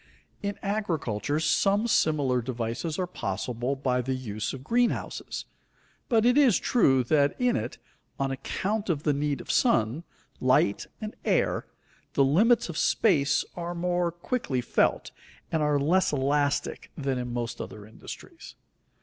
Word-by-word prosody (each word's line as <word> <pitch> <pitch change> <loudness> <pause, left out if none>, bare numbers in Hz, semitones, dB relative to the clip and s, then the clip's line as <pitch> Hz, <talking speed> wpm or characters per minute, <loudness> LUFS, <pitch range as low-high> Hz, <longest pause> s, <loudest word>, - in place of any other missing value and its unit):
In 200 0 -3
agriculture 160 - -1
some 195 +8 +2
similar 145 - +2
devices 120 +6 -3
are 185 - 0
possible 120 - -3
by 130 -2 0
the 130 +2 -2
use 110 -4 -4
of 135 -1 -8
greenhouses, 240 - -1 0.6
but 230 -3 +3
it 250 +4 +5
is 260 -9 +5
true 135 - +3
that 145 +3 +2
in 250 -1 +2
it, - - -3 0.4
on 135 0 0
account 200 - -2
of 155 -4 0
the 150 - +2
need 145 0 -1
of - - -4
sun, 130 - +2 0.4
light, 125 -5 +2
and 215 0 -5
air, - - +1 0.5
the 140 - +4
limits 210 - +4
of 170 -3 -4
space 150 -11 +3
are 175 0 -4
more 175 0 0
quickly 175 - -2
felt, 125 - +1 0.4
and 160 - +1
are 150 -1 +2
less 170 +7 +2
elastic 145 +1 0
than 135 -3 -1
in 125 -1 -4
most 120 -1 -3
other 105 -1 -8
industries. 110 - -11
145 Hz, 145 wpm, -27 LUFS, 130-190 Hz, 0.6 s, it